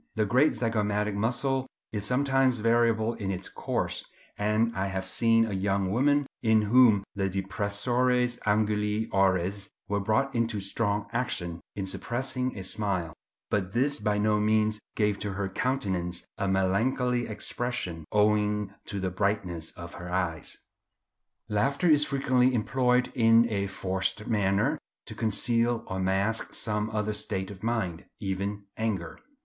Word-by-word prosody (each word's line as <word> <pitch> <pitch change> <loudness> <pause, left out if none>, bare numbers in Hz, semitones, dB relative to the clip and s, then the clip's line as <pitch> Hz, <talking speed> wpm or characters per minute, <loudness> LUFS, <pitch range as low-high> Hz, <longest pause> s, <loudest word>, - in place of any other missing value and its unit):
The 110 -1 +2
great 130 +8 +4
zygomatic 105 -2 0
muscle 130 +5 0 0.2
is 105 -2 -3
sometimes 135 0 +2
variable 115 0 +2
in 100 -4 -4
its 95 -1 -3
course, - - -2 0.3
and 110 +2 +1
I 95 +1 0
have 95 -1 -3
seen 115 +3 +3
a 110 - -4
young 95 0 0
woman 145 +5 +3 0.2
in 110 -2 +4
whom 110 -2 +5
the 95 -1 -1
depressores 120 +6 0
anguli 105 +1 +1
oris 95 +1 +1 0.2
were 100 0 0
brought 110 +7 +1
into 115 -2 0
strong 100 +1 -1
action 90 -9 -2
in 100 - -3
suppressing 125 +5 -2
a 95 - -5
smile; 95 -5 -2 0.4
but 95 -2 0
this 140 +4 +1
by 105 -1 0
no 105 0 +2
means 110 0 +2 0.2
gave 105 -2 +1
to 100 -1 -3
her 100 0 -2
countenance 95 -7 -2
a 100 - -2
melancholy 115 +6 +1
expression, 105 -6 -3
owing 105 -1 +2
to 100 - -4
the 95 -1 -2
brightness 90 -4 -1
of 85 0 -9
her 90 0 -8
eyes. 90 -4 -2 0.9
Laughter 140 - +1
is 150 -2 +5
frequently 130 -2 +2
employed 125 +2 +2
in 115 0 +5
a 100 -1 0
forced 95 +2 -2
manner 100 -3 +1 0.3
to - - -7
conceal 115 +2 +1
or 95 - -4
mask 95 +4 0
some 105 0 -1
other 105 -1 -1
state 95 -2 -3
of 95 -2 -11
mind, 110 -8 -2
even 100 +1 -3
anger. 100 -7 -2
105 Hz, 145 wpm, -28 LUFS, 95-120 Hz, 0.9 s, whom